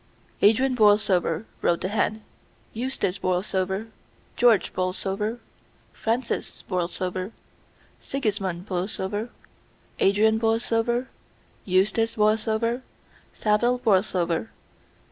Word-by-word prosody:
"Adrian 255 +6 +4
Borlsover," 205 -4 +3 0.2
wrote 170 - +1
the 185 - -1
hand, 215 +1 0 0.5
"Eustace 220 -6 -2
Borlsover, 190 +3 -1 0.5
George 235 -4 +4
Borlsover, 195 +4 -1 0.6
Francis 230 +2 -2
Borlsover 185 +1 -2 0.7
Sigismund 195 -9 -2
Borlsover, 195 +3 -2 0.7
Adrian 220 +3 +4
Borlsover, 230 +2 +1 0.6
Eustace 215 +5 +2
Borlsover, 220 +2 +1 0.5
Saville 235 +4 +2
Borlsover. 190 -5 +1
210 Hz, 75 wpm, -25 LUFS, 185-225 Hz, 0.7 s, Adrian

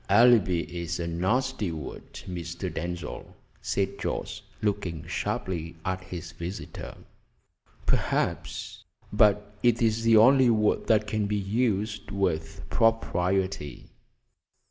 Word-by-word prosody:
"Alibi 110 -8 +5
is 85 0 -4
a 85 - -2
nasty 100 +5 0
word, 80 -4 -7 0.2
Mr. 85 0 -5
Denzil," 85 -1 -5 0.3
said - - -1
Jorce, - - -3 0.2
looking 95 -6 -1
sharply 85 0 -3
at 95 0 -2
his 85 -2 -7
visitor. 85 +4 -7 0.9
"Perhaps, - - -1 0.3
but 105 -1 +3
it 120 -1 +3
is 115 -1 +2
the 115 -1 +5
only 130 +3 +7
word 110 -2 +2
that 110 -1 +4
can 105 0 -1
be 105 - 0
used 105 -1 -1
with 90 -5 -2
propriety." 95 -7 0
95 Hz, 110 wpm, -27 LUFS, 85-110 Hz, 0.9 s, only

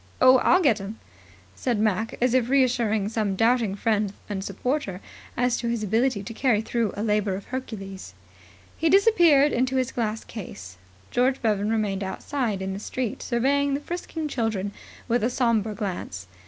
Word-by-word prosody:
Oh, 255 0 +7
I'll 365 +7 +4
get 230 -9 +3
'em," 205 +3 -7 0.6
said 245 -3 -1
Mac, 215 +1 0
as 250 0 +2
if 250 -2 +2
reassuring 240 -6 +2
some 215 -3 -1
doubting 225 -1 +2
friend 210 -1 0 0.2
and 195 -2 -4
supporter 200 -1 -2 0.4
as 245 0 +2
to 235 - -3
his 235 -2 -1
ability 220 +1 +1
to 215 - -7
carry 235 -2 +2
through 225 -2 -1
a 205 - -2
labour 210 -3 +1
of 195 - -7
Hercules. 195 - -7 0.6
He 325 - +1
disappeared 340 -8 +5
into 255 +2 0
his 260 0 0
glass 220 -2 -2
case. 95 - -9 0.3
George 255 +2 +2
Bevan 210 -2 +1
remained 210 -3 0
outside 210 0 -2
in 190 0 -3
the 195 - -5
street 240 +1 -4
surveying 275 +3 +1
the - - -2
frisking 325 0 -5
children 225 -7 -2 0.4
with 240 -1 +1
a 235 - +2
sombre 230 -4 +1
glance. 180 - -5
225 Hz, 170 wpm, -25 LUFS, 205-255 Hz, 0.6 s, Oh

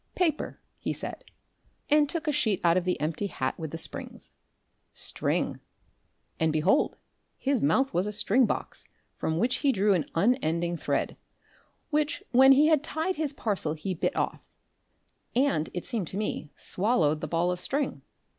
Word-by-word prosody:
"Paper," 330 -5 0 0.2
he - - -2
said, - - -5 0.6
and 295 -1 +4
took 335 0 -3
a - - +3
sheet 215 -8 +1
out 170 -1 +4
of 180 -1 +1
the 180 - 0
empty 160 +7 -1
hat 130 -8 -3
with 160 -1 -4
the 165 - -5
springs; - - 0 0.6
"string," - - -1 0.8
and 160 0 +2
behold 155 - +2 0.4
his 275 -3 0
mouth 260 - +2
was 180 +4 +1
a - - -2
string 210 +4 +2
box, - - -4 0.3
from 160 - -2
which 240 +8 +2
he 280 - +2
drew 205 -3 +3
an 175 -5 -1
unending 175 -5 +1
thread, - - -1 0.7
which 300 0 0
when 265 +2 +8
he 285 +3 +5
had 310 -2 +4
tied 325 +3 -2
his 305 -3 -1
parcel 200 - -2
he 175 +5 -3
bit 170 - -1
off - - -1 0.9
and, 250 - +2
it 175 - -5
seemed 220 -8 -2
to 190 - -5
me, 205 -7 -3
swallowed 170 -7 +1
the 155 - -3
ball 170 +3 +1
of 180 - -3
string. 275 +8 -2
205 Hz, 165 wpm, -28 LUFS, 165-275 Hz, 0.9 s, when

